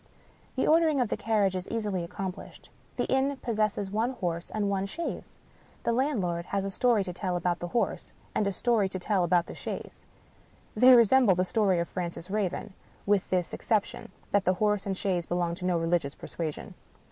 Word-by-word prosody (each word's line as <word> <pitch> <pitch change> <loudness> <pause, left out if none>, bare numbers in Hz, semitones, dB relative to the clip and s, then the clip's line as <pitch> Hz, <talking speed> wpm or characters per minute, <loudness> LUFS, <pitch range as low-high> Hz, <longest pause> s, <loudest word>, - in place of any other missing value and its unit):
The - - +1
ordering 315 -2 +4
of 245 -4 +1
the - - 0
carriage 205 -4 +1
is 185 0 -4
easily 210 -6 -2
accomplished. 185 +2 -7 0.2
The - - 0
inn 265 +1 +1
possesses 215 -5 -1
one 225 +5 0
horse 175 -7 -3
and 210 -1 -1
one 195 -1 0
chaise. 335 +12 -5 0.5
The - - +1
landlorjd 210 - 0
has 195 +1 -2
a 195 - -3
story 230 0 +2
to 180 -2 -6
tell 180 0 -2
of 175 0 0
the 175 - -4
horse, 230 +7 -1 0.2
and 210 - +1
a - - +1
story 215 -1 +1
to 190 - -4
tell 185 0 +1
of 175 0 +3
the - - -8
chaise. - - -7 0.7
They 250 +4 +8
resemble 235 -3 +5
the 185 +1 +1
story 200 -2 +2
of 170 0 0
Francis 175 0 -5
Raven 205 0 -2 0.2
— - - -30
^with 200 -2 +2
this 180 -2 0
ex - - -8
ception, 215 -3 0 0.2
that 200 -1 +3
the 185 0 +2
horse 210 0 +1
and 195 -1 -2
chaise 180 -4 -1
belong 175 -1 0
to 180 +1 -6
no 180 -1 +2
religious 165 -3 0
persuasion. 160 -3 -5
195 Hz, 195 wpm, -28 LUFS, 180-220 Hz, 0.7 s, They